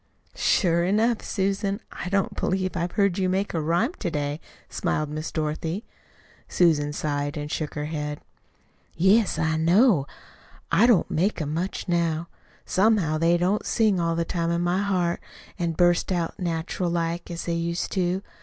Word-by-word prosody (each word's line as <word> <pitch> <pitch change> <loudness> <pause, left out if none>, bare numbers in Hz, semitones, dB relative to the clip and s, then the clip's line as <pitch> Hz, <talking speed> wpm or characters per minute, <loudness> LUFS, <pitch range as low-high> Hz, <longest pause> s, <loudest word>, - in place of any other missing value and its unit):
"Sure 170 -3 +2
enough, 215 +5 +2
Susan! 195 0 -1
I 180 - -5
don't 195 0 0
believe 185 0 -1
I've 175 0 -2
heard 200 -3 +2
you 185 -1 +1
make 195 +2 -1
a 165 - 0
rhyme 175 - +1
to - - -1
day," 145 -1 -2 0.3
smiled 150 -1 -1
Miss 155 +1 -4
Dorothy. 160 +6 -3 0.6
Susan 150 -4 +3
sighed 145 0 -2
and 150 0 -5
shook 155 -2 -3
her 150 -1 -2
head. 150 -1 -4 0.8
"Yes, 195 +3 +3
I 160 0 +1
know. 170 - +4 0.6
I 230 - +5
don't 225 -8 +3
make 185 +6 +1
'em 150 -2 -2
much 180 +6 -3
now. 170 -1 0 0.4
Somehow 190 -6 +2
they 170 +1 +3
don't 185 +4 +1
sing 215 -5 +2
all 165 -1 0
the 170 0 0
time 170 0 -1
in 170 0 0
my 175 +2 +1
heart, 180 -4 0 0.4
an' 170 -1 0
burst 175 +2 +2
out 175 +1 -2
natural 170 0 -2
like, 170 0 -2
as 170 -1 -5
they 170 - -1
used 170 +1 -2
to. 185 0 0
170 Hz, 165 wpm, -25 LUFS, 160-190 Hz, 0.8 s, I